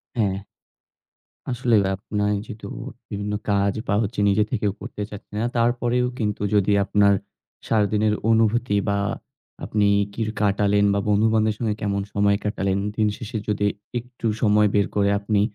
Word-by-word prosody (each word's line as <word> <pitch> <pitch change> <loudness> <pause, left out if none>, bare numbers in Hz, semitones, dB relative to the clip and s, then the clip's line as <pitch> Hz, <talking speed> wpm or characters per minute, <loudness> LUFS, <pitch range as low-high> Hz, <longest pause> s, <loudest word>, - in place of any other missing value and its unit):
হ্যাঁ। 100 -5 +1 1.1
আসলে 120 -1 +2
ভাই 95 - 0
আপনি 105 +1 -1
যেহেতু 110 -4 -8 0.4
বিভিন্ন 105 +1 -3 0.2
কাজ 100 0 +2
বা 100 - +1
হচ্ছে 105 0 -4
নিজে 105 +2 +3
থেকেও 105 -4 0
করতে - - -7
চাচ্ছে 105 - -11
না, 115 - 0
তারপরেও 120 +1 +1
কিন্তু 105 -3 -1
যদি 105 0 +3
আপনার 100 +1 +4 0.5
সারাদিনের 105 -1 +2 0.2
অনুভূতি 115 0 +2
বা 100 - +1 0.7
আপনি 105 -1 +1 0.3
কির 110 0 -2
কাটালেন 100 0 +3
বা 100 - +1
বন্ধুবান্ধবের 110 +1 +3
সঙ্গে 110 -3 -1
কেমন 100 -1 0
সময় 100 0 +3
কাটালেন, 100 -2 0 0.2
দিনশেষে 110 +1 -1
যদি 105 -1 0 0.3
একটু 120 0 -10 0.2
সময় 105 -1 +4
বের 100 -1 +3
করে 100 -1 +3
আপনি 105 0 +1
105 Hz, 145 wpm, -23 LUFS, 100-110 Hz, 1.1 s, আপনার